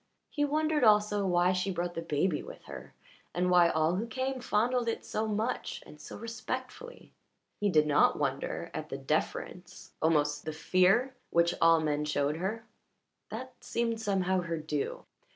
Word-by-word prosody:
He 290 Hz, -, 0 dB
wondered 305 Hz, 0 st, +1 dB
also 210 Hz, -2 st, +4 dB
why 175 Hz, 0 st, +3 dB
she 185 Hz, +1 st, -1 dB
brought 175 Hz, -1 st, -3 dB
her 165 Hz, -, -2 dB
baby 160 Hz, +1 st, 0 dB
with -, -, -11 dB
her, -, -, -10 dB, 0.4 s
and 180 Hz, +1 st, +1 dB
why 175 Hz, -1 st, +6 dB
all 160 Hz, +3 st, +1 dB
who 225 Hz, +4 st, -2 dB
came 260 Hz, +2 st, -3 dB
fondled 245 Hz, +1 st, +1 dB
it 230 Hz, -, -2 dB
so 220 Hz, +1 st, -2 dB
much 215 Hz, +3 st, -2 dB
and 150 Hz, -, -14 dB
so -, -, -9 dB
respectfully. 255 Hz, -, -6 dB, 0.5 s
He 205 Hz, -, +2 dB
did 155 Hz, -4 st, +4 dB
not 150 Hz, -1 st, +4 dB
wonder 140 Hz, -2 st, -2 dB
at 155 Hz, -, -5 dB
the 135 Hz, -, -4 dB
deference, 155 Hz, +5 st, -3 dB
almost 150 Hz, -2 st, +2 dB
the 155 Hz, -, -4 dB
fear, 185 Hz, -, +3 dB, 0.2 s
which 170 Hz, 0 st, +3 dB
all 165 Hz, 0 st, +6 dB
men 150 Hz, -1 st, 0 dB
showed 145 Hz, 0 st, 0 dB
her 215 Hz, +6 st, -3 dB, 0.6 s
that -, -, -6 dB
seemed 230 Hz, -1 st, -1 dB
somehow 190 Hz, -3 st, +1 dB
her 170 Hz, -1 st, -3 dB
due. 150 Hz, -2 st, -3 dB
180 Hz, 165 wpm, -30 LUFS, 155-225 Hz, 0.6 s, why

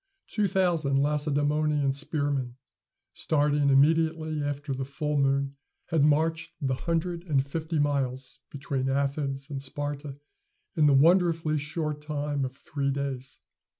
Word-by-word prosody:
Two 210 Hz, -2 st, 0 dB
thousand 170 Hz, -7 st, +1 dB
Lacedæmonian 145 Hz, 0 st, +1 dB
spearmen, 140 Hz, -3 st, -1 dB, 0.6 s
starting 145 Hz, -1 st, +1 dB
immediately 155 Hz, +2 st, +3 dB
after 145 Hz, 0 st, -3 dB
the 135 Hz, 0 st, -3 dB
full 150 Hz, +2 st, -3 dB
moon, 140 Hz, 0 st, +1 dB, 0.3 s
had 160 Hz, -4 st, +2 dB
marched 160 Hz, +2 st, +2 dB
the 135 Hz, -4 st, 0 dB
hundred 170 Hz, +4 st, -2 dB
and 140 Hz, -4 st, +2 dB
fifty 160 Hz, +3 st, -3 dB
miles 135 Hz, -3 st, -1 dB
between 135 Hz, -1 st, -2 dB
Athens 140 Hz, 0 st, -1 dB
and 135 Hz, -1 st, -4 dB
Sparta 145 Hz, 0 st, -4 dB, 0.6 s
in 150 Hz, -2 st, +4 dB
the 140 Hz, -, +5 dB
wonderfully 165 Hz, 0 st, +4 dB
short 150 Hz, 0 st, -3 dB
time 145 Hz, -1 st, -2 dB
of 130 Hz, 0 st, -6 dB
three 140 Hz, 0 st, -2 dB
days. 135 Hz, -2 st, -4 dB
145 Hz, 125 wpm, -27 LUFS, 140-155 Hz, 0.6 s, the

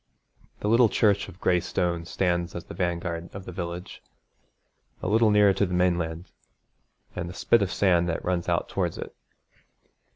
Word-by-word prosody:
The -, -, -1 dB
little 115 Hz, +1 st, +5 dB
church 100 Hz, -2 st, +2 dB
of 90 Hz, -, -14 dB
gray 90 Hz, -1 st, +2 dB
stone 85 Hz, -1 st, -2 dB
stands 85 Hz, -1 st, -1 dB
as 85 Hz, -, -5 dB
the -, -, -9 dB
vanguard 85 Hz, -1 st, -3 dB
of 95 Hz, -1 st, -7 dB
the -, -, -7 dB
village, 85 Hz, 0 st, -6 dB, 1.0 s
a -, -, -4 dB
little 110 Hz, +3 st, +4 dB
nearer 105 Hz, -1 st, +5 dB
to 100 Hz, -, +1 dB
the 90 Hz, -, -2 dB
mainland, 85 Hz, -1 st, 0 dB, 0.8 s
and 85 Hz, -, -4 dB
the 90 Hz, -, -9 dB
spit 115 Hz, -, +3 dB
of 95 Hz, -1 st, 0 dB
sand 90 Hz, -3 st, +2 dB
that 80 Hz, -, -3 dB
runs 90 Hz, -2 st, -1 dB
out -, -, 0 dB
towards -, -, -2 dB
it. -, -, -7 dB
90 Hz, 170 wpm, -26 LUFS, 85-100 Hz, 1.0 s, little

